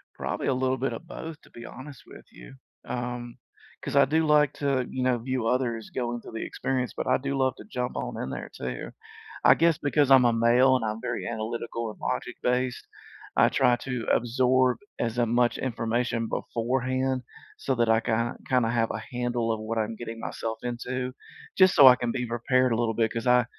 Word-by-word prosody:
Probably -, -, -3 dB
a 135 Hz, -, +2 dB
little 130 Hz, 0 st, 0 dB
bit 135 Hz, +2 st, -1 dB
of 170 Hz, -, -8 dB
both, 160 Hz, -3 st, -8 dB
to -, -, -20 dB
be 120 Hz, -, -11 dB
honest 130 Hz, +2 st, -10 dB
with -, -, -13 dB
you, -, -, -13 dB, 0.3 s
um, 120 Hz, -1 st, -4 dB, 0.5 s
'cause -, -, -3 dB
I 140 Hz, -, +7 dB
do 160 Hz, +4 st, +1 dB
like 150 Hz, -2 st, +4 dB
to, 135 Hz, -3 st, 0 dB
you 130 Hz, -, -4 dB
know, 125 Hz, -1 st, +2 dB
view 125 Hz, 0 st, -2 dB
others 120 Hz, -3 st, -1 dB
going 120 Hz, -1 st, -3 dB
through -, -, -11 dB
the 115 Hz, -, -4 dB
experience, 130 Hz, -2 st, -2 dB
but -, -, -3 dB
I 130 Hz, -, +4 dB
do 135 Hz, +1 st, -3 dB
love 130 Hz, -1 st, +1 dB
to -, -, -11 dB
jump 125 Hz, -, -4 dB
on -, -, -4 dB
in 65 Hz, -, -4 dB
there -, -, -5 dB
too. 65 Hz, -1 st, -5 dB, 0.5 s
I -, -, +8 dB
guess 165 Hz, -1 st, +3 dB
because 145 Hz, -1 st, +1 dB
I'm 130 Hz, -2 st, +7 dB
a 120 Hz, -, +4 dB
male 120 Hz, +3 st, +4 dB
and 125 Hz, -, -2 dB
I'm 110 Hz, 0 st, -3 dB
very -, -, -3 dB
analytical 115 Hz, 0 st, -4 dB
and 105 Hz, -, -12 dB
logic -, -, -3 dB
based, 125 Hz, 0 st, 0 dB, 0.5 s
I -, -, +6 dB
try 125 Hz, -2 st, +3 dB
to 125 Hz, -2 st, -4 dB
absorb 125 Hz, +1 st, +2 dB, 0.2 s
as 115 Hz, 0 st, -1 dB
a 120 Hz, -, +3 dB
much 120 Hz, +1 st, +2 dB
information 115 Hz, -1 st, -1 dB
beforehand 130 Hz, +3 st, -1 dB, 0.3 s
so 135 Hz, -, -1 dB
that 120 Hz, -2 st, +1 dB
I 110 Hz, -, +5 dB
ki 115 Hz, -, -2 dB, 0.4 s
kinda 125 Hz, -3 st, +2 dB
have 115 Hz, -1 st, +1 dB
a -, -, -5 dB
handle 120 Hz, -2 st, -1 dB
of 110 Hz, -, -2 dB
what 110 Hz, +1 st, -3 dB
I'm 110 Hz, +1 st, -2 dB
getting 115 Hz, 0 st, -7 dB
myself 110 Hz, 0 st, -4 dB
into 125 Hz, +1 st, -3 dB, 0.5 s
just 185 Hz, -1 st, +6 dB
so 140 Hz, -6 st, +10 dB
I 125 Hz, -, +7 dB
can 120 Hz, -2 st, -2 dB
be 125 Hz, 0 st, -2 dB
prepared 125 Hz, +2 st, +1 dB
a -, -, +2 dB
little 115 Hz, -1 st, 0 dB
bit 110 Hz, -1 st, +1 dB
'cause 115 Hz, +1 st, -4 dB
I, 125 Hz, 0 st, +5 dB
125 Hz, 210 wpm, -27 LUFS, 115-130 Hz, 0.5 s, so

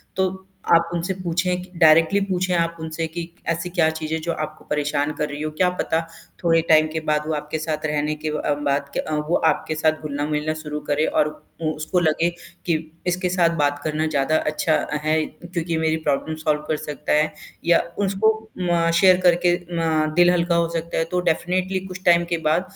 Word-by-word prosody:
तो 190 Hz, 0 st, -2 dB, 0.3 s
आप 170 Hz, 0 st, +4 dB
उनसे 175 Hz, +3 st, -1 dB
पूछें 180 Hz, 0 st, -1 dB
कि 180 Hz, 0 st, -13 dB
डायरेक्टली 165 Hz, +4 st, +6 dB
पूछें 185 Hz, -1 st, 0 dB
आप 170 Hz, 0 st, 0 dB
उनसे 160 Hz, +1 st, -3 dB
कि 170 Hz, +2 st, -5 dB, 0.3 s
ऐसी 170 Hz, +2 st, -1 dB
क्या 170 Hz, -3 st, +2 dB
चीज़ 160 Hz, 0 st, -4 dB
है 160 Hz, -, 0 dB
जो -, -, +2 dB
आपको 155 Hz, -1 st, -5 dB
परेशान 150 Hz, 0 st, 0 dB
कर 150 Hz, 0 st, -2 dB
रही 145 Hz, +1 st, -6 dB
हो, 155 Hz, -, -1 dB
क्या 180 Hz, +4 st, +2 dB
पता 180 Hz, -2 st, -1 dB, 0.4 s
थोड़े 165 Hz, -1 st, +4 dB
टाइम 155 Hz, 0 st, +6 dB
के 160 Hz, -, -1 dB
बाद 150 Hz, 0 st, +2 dB
वो 160 Hz, -, -1 dB
आपके 150 Hz, +1 st, -4 dB
साथ 155 Hz, 0 st, -3 dB
रहने 150 Hz, 0 st, 0 dB
के 155 Hz, -, -2 dB
व 150 Hz, -, -2 dB
अ, 145 Hz, -, +1 dB
बात 140 Hz, -1 st, -1 dB
के -, -, -1 dB
अ, 155 Hz, -, -3 dB
वो 150 Hz, +3 st, 0 dB
आपके 155 Hz, -, -1 dB
साथ 155 Hz, 0 st, +1 dB
घुलना-मिलना 150 Hz, +1 st, -2 dB
शुरू 150 Hz, -1 st, -4 dB
करे 150 Hz, +2 st, +2 dB
और 150 Hz, -, +2 dB, 0.3 s
उ 155 Hz, -1 st, 0 dB
उसको 155 Hz, +4 st, -1 dB
लगे 165 Hz, +1 st, +2 dB, 0.4 s
कि 170 Hz, -, +2 dB, 0.3 s
इसके 180 Hz, +1 st, 0 dB
साथ 175 Hz, -2 st, +3 dB
बात 145 Hz, -1 st, +1 dB
करना 155 Hz, 0 st, -1 dB
ज़्यादा 155 Hz, 0 st, +1 dB
अच्छा 155 Hz, +1 st, 0 dB, 0.3 s
है, 155 Hz, 0 st, +2 dB
क्योंकि 170 Hz, 0 st, -4 dB
मेरी 160 Hz, 0 st, +1 dB
प्रॉब्लम 150 Hz, +2 st, 0 dB
सॉल्व 155 Hz, -1 st, 0 dB
कर 155 Hz, -, 0 dB
सकता 150 Hz, -1 st, -3 dB
है, 155 Hz, 0 st, +2 dB, 0.3 s
या 170 Hz, 0 st, +5 dB, 0.3 s
उसको 195 Hz, +3 st, +2 dB
अम, 180 Hz, -6 st, -1 dB
शेयर 185 Hz, -2 st, +7 dB
करके 175 Hz, 0 st, +4 dB, 0.2 s
ना 160 Hz, -2 st, +1 dB
दिल 175 Hz, 0 st, +6 dB
हल्का 170 Hz, -1 st, +1 dB
हो 170 Hz, 0 st, +2 dB
सकता 165 Hz, 0 st, -3 dB
है -, -, +2 dB
तो 180 Hz, -, +1 dB
डेफ़िनेटली 185 Hz, +3 st, -1 dB
कुछ 185 Hz, 0 st, -9 dB
टाइम 170 Hz, 0 st, +5 dB
के -, -, +2 dB
बाद 155 Hz, -, +3 dB
160 Hz, 205 wpm, -22 LUFS, 155-175 Hz, 0.4 s, शेयर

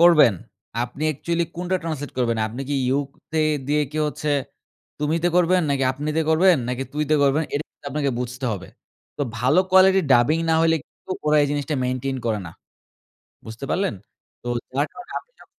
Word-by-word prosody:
করবেন, 165 Hz, -, +7 dB, 0.5 s
আপনি 125 Hz, +4 st, -9 dB
অ্যাকচুয়ালি 170 Hz, +3 st, -1 dB
কোনটা 180 Hz, +2 st, 0 dB
ট্রান্সলেট 150 Hz, -4 st, -4 dB
করবেন? 115 Hz, -2 st, +1 dB
আপনি 115 Hz, +4 st, -7 dB
কি 145 Hz, -, 0 dB
You 135 Hz, +2 st, +2 dB, 0.3 s
তে 160 Hz, -, +1 dB, 0.3 s
দিয়ে 150 Hz, +1 st, +2 dB
কি 155 Hz, -, -3 dB
হচ্ছে 150 Hz, 0 st, -3 dB, 0.7 s
তুমিতে 160 Hz, +3 st, +1 dB
করবেন? 180 Hz, +1 st, +4 dB
নাকি 135 Hz, -1 st, +1 dB
আপনিতে 150 Hz, +4 st, -1 dB
করবেন? 175 Hz, +3 st, +5 dB
নাকি 125 Hz, +1 st, -2 dB
তুইতে 150 Hz, +1 st, +1 dB
করবেন? 140 Hz, +3 st, +3 dB
এটা 145 Hz, +2 st, -1 dB
কিন্তু -, -, -16 dB
আপনাকে 140 Hz, 0 st, 0 dB
বুঝতে 125 Hz, +1 st, -5 dB
হবে। 95 Hz, -2 st, -6 dB, 0.5 s
তো -, -, -1 dB, 0.2 s
ভালো 130 Hz, +8 st, +3 dB
কোয়ালিটির 190 Hz, -1 st, +6 dB
ডাবিং 125 Hz, +6 st, +4 dB
না -, -, +4 dB
হইলে 165 Hz, 0 st, +4 dB
কিন্তু -, -, -19 dB, 0.2 s
ওরা 150 Hz, 0 st, +4 dB
এই -, -, +3 dB
জিনিসটা 145 Hz, +1 st, -1 dB
মেইনটেইন 130 Hz, +1 st, -2 dB
করে 110 Hz, -2 st, +1 dB
না। -, -, -8 dB, 1.0 s
বুঝতে 110 Hz, +5 st, -7 dB
পারলেন? 195 Hz, -9 st, 0 dB, 0.5 s
তো -, -, -8 dB, 0.2 s
যার 140 Hz, +3 st, 0 dB
কারণে 245 Hz, -1 st, -11 dB
আপনি -, -, -25 dB
যখন -, -, -17 dB
150 Hz, 175 wpm, -23 LUFS, 130-165 Hz, 1.0 s, করবেন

